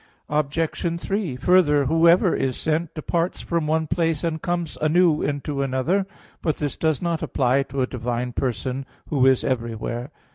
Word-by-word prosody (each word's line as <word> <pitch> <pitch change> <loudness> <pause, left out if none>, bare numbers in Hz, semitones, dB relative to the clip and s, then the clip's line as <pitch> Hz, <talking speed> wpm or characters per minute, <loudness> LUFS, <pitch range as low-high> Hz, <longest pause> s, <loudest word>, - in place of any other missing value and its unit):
Obj. 160 +3 -1
3: 195 -7 -2
Further, 150 0 +4
whoever 165 +5 +4
is 130 -2 -1
sent, 160 +1 -1
departs 170 +3 -1
from 170 -3 -1
one 160 +1 +1
place 165 -1 0
and 160 -2 -2
comes 175 -2 -2
anew 155 0 +3
into 145 0 -2
another. 140 +9 0 0.3
But 155 - 0
this 145 -2 -2
does 160 -1 0
not 170 -2 -1
apply 130 +1 +1
to 135 0 -1
a - - +2
divine 125 0 -3
person, 130 +2 -2 0.2
Who 135 -3 +3
is 130 -1 +4
everywhere. 120 0 -3
150 Hz, 155 wpm, -23 LUFS, 130-170 Hz, 0.3 s, Further